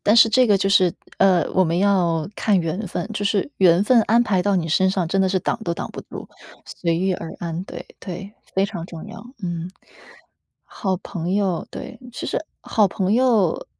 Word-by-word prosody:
但 210 - +4
是 230 -1 +8
这 255 +2 +4
个 205 -2 +4
就 195 0 0
是， 185 -3 +4 0.3
呃， 190 -3 +4
我 185 - +3
们 165 0 0
要 180 -4 +2
看 205 -4 +2
缘 180 +6 -3
分， 175 0 -4
就 205 -1 -3
是 200 +6 0
缘 180 0 +5
分 235 +2 +5
安 230 +3 +3
排 195 -5 +1
到 205 -1 +1
你 165 -3 0
身 190 +4 +3
上， 185 -3 0
真 195 +2 +1
的 190 - +3
是 190 0 0
挡 - - -1
都 170 -1 -1
挡 - - -5
不 - - -7
住， - - -9 0.4
随 170 -2 -2
遇 190 +2 +1
而 165 -2 -7
安， 170 +1 -4
对， - - -8
对， 190 +3 -7 0.2
非 190 - +3
常 180 -5 -5
重 165 -3 -9
要， - - -10 0.2
嗯。 175 0 -4 1.0
好 190 -3 -1
朋 180 -1 -4
友， 195 -4 0
对， - - -8
其 - - -5
实 320 - -2 0.2
好 210 -4 +2
朋 190 +2 -1
友 230 -7 +4
呃， - - -8
190 Hz, 225 characters per minute, -22 LUFS, 175-205 Hz, 1.0 s, 是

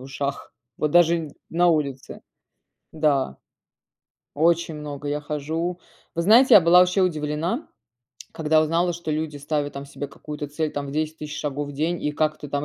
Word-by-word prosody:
в - - -10
ушах, 140 +1 -5 0.2
вот 150 - 0
даже 170 -2 +3 0.2
на 175 +1 +3
улице. 140 -5 -1 0.7
Да, 145 - +1 1.0
очень 165 +1 +2
много 145 -1 -6
я 150 +1 -2
хожу. 160 +4 -3 0.4
Вы 170 - 0
знаете, 230 +8 +6
я 195 - +9
была 170 +2 +6
вообще 180 +2 +3
удивлена, 165 - -1 0.7
когда 155 0 +2
узнала, 170 +3 +1
что 170 -1 -5
люди 155 -1 -2
ставят 145 0 -2
там 140 0 -7
себе 145 0 -6
какую-то 150 +1 -7
цель 150 +1 -2
там 145 -1 -4
в - - -5
10000 155 +1 -2
тысяч 150 -1 -6
шагов 145 -1 -3
в - - -7
день 160 +5 -1
и 150 - -1
как 155 0 0
ты 145 - -8
там. 145 +1 -2
155 Hz, 175 wpm, -24 LUFS, 145-170 Hz, 1.0 s, я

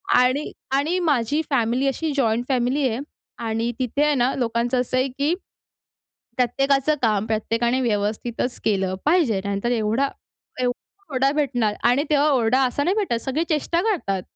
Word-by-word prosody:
आणि, 255 +4 +2 0.2
आणि 290 +6 +1
माझी 295 -3 +1
फॅमिली 250 0 +1
अशी, 305 +4 -1
जॉइंट 240 -3 +1
फॅमिली 260 +2 +1
आहे 225 +1 -3 0.5
आणि 225 +2 -1
तिथे 260 +3 0
आहे 300 -1 +3
ना, 250 0 +2
लोकांचं 240 0 0
असं 255 +1 -2
आहे, 255 +1 +2
की 280 +5 -1 1.0
प्रत्येकाचं 275 +4 +2
काम 215 -3 +2
प्रत्येकाने 230 +3 0
व्यवस्थितच 230 +2 -2
केलं 190 -3 +1
पाहिजे. 295 - +3
नंतर 200 +4 -1
एवढा, 225 +4 +1 0.5
एवढा 280 +8 -5
ओरडा 270 +1 +2
भेटणार 245 -8 0
आणि 260 +4 +3
तेव्हा 295 0 +3
ओरडा 250 -1 +3
असा 255 +3 -1
नाही 360 +6 +1
भेटत, 405 - 0
सगळे 280 +4 -1
चेष्टा 330 +2 +1
करतात. 305 - -1
255 Hz, 150 wpm, -23 LUFS, 230-285 Hz, 1.0 s, आहे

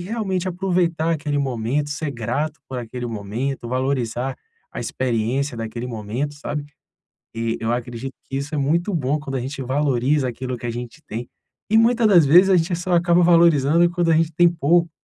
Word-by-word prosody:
realmente 190 -2 -2
aproveitar 175 -3 0
aquele 145 -2 -1
momento, 135 +2 -1
ser 150 0 -3
grato 145 +6 -3
por 130 - -4
aquele 120 +1 -5
momento, 115 +5 -4
valorizar 130 -1 -1 0.4
a - - -6
experiência 125 +2 -1
daquele 115 +2 -5
momento, 120 +6 -4
sabe? 145 0 -4 0.7
E 115 0 -1
eu 115 +1 -1
acredito 120 +2 -4 0.2
que 135 - -4
isso 140 +2 -4
é - - 0
muito 170 +8 +1
bom 145 0 0
quando 135 -2 -4
a - - -1
gente 135 +2 -5
valoriza 135 +1 +1
aquilo 125 +1 -4
que 120 - -6
a 120 - -1
gente 120 +5 -7
tem, 115 +3 -6 0.4
e 220 - +5
muita 235 0 +3
das 175 -7 +6
vezes 180 +7 +6
a 185 - +6
gente 170 +1 +1
só 180 +1 -3
acaba 170 +1 +4
valorizando 170 -1 +5
quando 175 -1 +1
a - - +4
gente 165 0 +1
tem 175 +2 +5
pouco, 170 +1 +2
145 Hz, 185 wpm, -22 LUFS, 125-170 Hz, 0.7 s, das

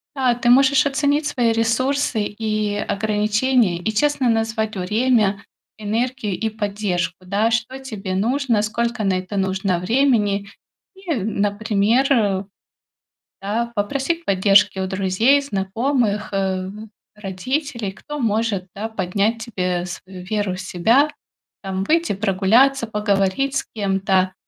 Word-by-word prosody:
а, 255 -3 +2
ты 240 0 0
можешь 275 +4 +5
оценить 285 +1 +1
свои 240 -6 +1
ресурсы 230 +1 +1
и 215 -1 -2
ограничения, 210 0 +1
и 180 +5 -2
честно 280 +2 +1
назвать 225 -1 0
время, 210 +1 +1 0.3
энергию 220 +1 -2
и 220 - -1
поддержку, 200 -5 -2
да? 205 +5 +1
Что 230 +4 -1
тебе 210 -8 -5
нужно, 235 +2 +1
сколько 235 +2 -2
на 195 -2 +2
это 185 +2 -6
нужно 190 -1 0
времени. 205 -2 +1 0.5
И, 380 -3 -4
например, 210 +4 +1
э, 200 -7 +2 1.0
да, 225 +4 -2
попросить 275 +11 -1
поддержки 195 0 +4
у 190 - -1
друзей, 195 +9 +2
знакомых, 220 -1 -1
а, 190 -1 0
м, 210 +3 -9 0.3
родителей, 220 - -3
кто 295 +9 -8
может, 220 -5 0
да, 215 +3 -4
поднять 215 +3 -1
тебе 180 -6 -2
свою 185 +1 -9
веру 205 -1 -2
в 185 - -6
себя, 225 +11 +2 0.5
там, 190 -1 -3
выйти 330 +3 +1
прогуляться, 220 +7 +3
поговорить 210 +5 0
с - - -2
кем-то 195 -2 +1
215 Hz, 125 wpm, -21 LUFS, 195-245 Hz, 1.0 s, можешь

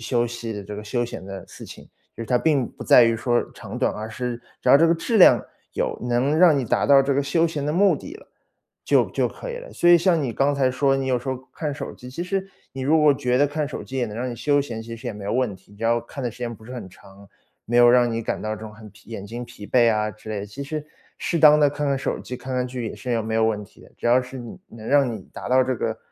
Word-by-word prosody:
休 120 0 0
休 - - 0
息 120 -1 -5
的 105 -1 -6
这 105 +1 -8
个 105 - -7
休 120 +2 -1
闲 95 - -8
的 95 0 -7
事 - - -11
情。 - - -12 0.3
就 115 - -6
是 - - -7
它 125 - +2
并 140 -2 +1
不 - - -10
在 - - +7
于 115 0 +2
说 120 +1 +1
长 - - -8
短， - - +2
而 110 +1 -6
是 125 0 -4 0.2
只 - - -2
要 135 - +9
这 165 +3 +5
个 165 - +3
质 225 +8 -1
量 190 - +7 0.3
有， - - -2
能 125 +5 +1
让 170 -4 +6
你 - - 0
达 115 - 0
到 140 -1 +6
这 140 0 0
个 140 - +2
休 165 +4 +1
闲 150 -3 -4
的 150 - -1
目 185 -2 +4
的 285 - -10
了， 430 +6 -13 0.6
就 - - +3
就 - - 0
可 - - -7
以 480 - -5
了。 - - -10
所 175 - +2
以 175 - +9
像 170 -2 +2
你 120 -4 -3
刚 140 +1 +2
才 130 -2 +2
说， 135 +1 +2
你 135 - -2
有 125 -2 +1
时 130 +2 -4
候 130 - -3 0.2
看 150 -3 -3
手 140 -2 -6
机， 125 +1 -11
其 170 +7 -5
实 190 +1 -2 0.3
你 135 0 -6
如 155 +4 +3
果 150 -2 +5
觉 125 -1 0
得 145 - +4
看 150 +1 -2
手 145 - -6
机 135 - -7
也 125 - +1
能 105 - -7
让 125 +3 -3
你 120 - -6
休 145 +2 +2
闲， 115 -5 -5
其 115 0 -8
实 120 +2 -10
也 115 - -3
没 100 -1 -9
有 100 - -2
问 120 -6 0
题。 95 +2 -21
只 110 - -13
要 115 +1 +3
看 130 +3 -8
的 120 - -1
时 120 - -15
间 120 -1 -4
不 110 - -17
是 125 +3 -9
很 120 -6 -7
长， 95 +2 -17 0.4
没 120 - 0
有 120 0 +7
让 120 -1 +4
你 115 0 -2
感 - - -3
到 110 0 -3
这 110 - -12
种 105 -1 -8
很 105 0 -13
疲 100 +3 -19
眼 100 -3 -6
睛 120 +3 -6
疲 105 -3 -11
惫 120 -1 +4
啊 105 0 0
之 110 +1 -11
类 105 - -3
的， 100 - -6
其 135 +8 -8
实 150 +1 -5 0.3
适 170 - -2
当 150 -1 +7
地 145 - +5
看 145 +1 -3
看 140 -1 +1
手 - - -2
机、 125 - -7
看 130 +1 -6
看 125 - 0
剧 125 -2 -5
也 - - -5
是 115 +2 -2
没 110 0 -3
有 110 0 +3
问 105 -2 0
题 - - -21
的。 - - -17
只 - - -4
要 125 +2 +4
是 130 +1 -9
你 120 -2 -9
能 110 -1 -11
让 140 -3 +3
你 105 -4 -9
达 - - -7
到 130 0 +4
这 130 0 -1
个， - - -3
125 Hz, 330 characters per minute, -23 LUFS, 115-145 Hz, 0.6 s, 要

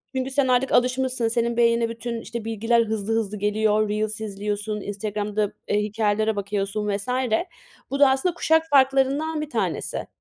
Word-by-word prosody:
Çünkü 260 +1 -2
sen 275 -1 +2
artık 255 +1 +2
alışmışsın, 255 -1 +2
senin 235 0 0
beynine 235 -1 +3
bütün 230 0 -5
bilgiler 225 +1 +1
hızlı 220 0 -2
hızlı 215 -2 -1
geliyor; 210 +1 +1
Reels 215 0 -2
izliyorsun, 210 0 -3
Instagram'da, 210 0 -2
e, 205 - +1
hikâyelere 215 0 0
bakıyorsun 200 +1 -2
vs. 200 - -9 0.8
Bu 275 - -2
da 280 -2 +7
aslında 270 +7 +1
kuşak 320 -1 +2
farklarından 275 +3 +3
1 300 - -5
tanesi. - - -2
225 Hz, 145 wpm, -24 LUFS, 210-260 Hz, 0.8 s, da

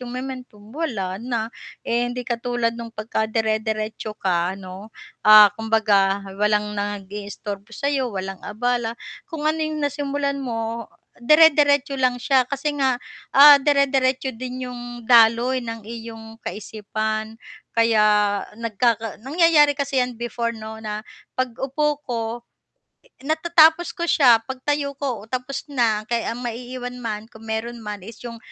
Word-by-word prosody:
yung 250 - -7
momentum 250 -5 -8
wala 210 - -3
na. 230 -1 -3 0.3
Eh, 240 +1 0
hindi 245 0 -5
katulad 240 -1 -1
nung 235 0 -7
pagka 220 0 -3
dire-diretso 220 -1 -2
ka 180 -1 0
ano, 190 +2 -10 0.3
ah, 215 -1 +8
kumbaga 205 -3 +2 0.2
walang 210 0 +1
nag-iistorbo 205 +1 -6
sa 285 0 -1
'yo 265 -3 0
walang 195 -3 -5
abala, 235 +1 -2 0.3
kung 315 -2 -6
ano 310 +1 +1
yung 310 -1 -2
nasimulan 285 0 -2
mo 230 -3 -4 0.3
dire-diretso 290 0 +5
lang 255 -1 +2
siya 255 0 +2
kasi 280 +2 -2
nga, 265 -3 +1 0.4
ah, 285 0 +10
dire-diretso 270 -2 +2
din 255 +2 -6
'yong 250 -1 -7 0.2
daloy 235 +2 +5
ng 230 -2 -7
iyong 225 0 -9
kaisipan. 215 +1 -4 0.4
Kaya 210 -3 +3 0.2
nagkaka 225 -1 -1
nangyayari 295 +1 +4
kasi 275 -2 0
yan 250 -1 -2
before 235 0 -3
'no 220 0 -8
na 215 0 -5 0.3
pag-upo 270 +4 -1
ko, 235 -2 -1 1.0
natatapos 320 +2 +4
ko 340 - -2
siya, 250 -8 +6
pagtayo 280 +2 -2
ko, 255 -7 -4
tapos 255 +3 -4
na 225 -5 +1
kaya 235 0 -1
ang 245 - -7
maiiwan 245 +1 -5
man 215 -3 -4
kung 220 - -14
meron 230 +2 -4
man, 210 -1 -5
is 225 - -11
'yong 235 -1 -7
235 Hz, 135 wpm, -22 LUFS, 215-265 Hz, 1.0 s, ah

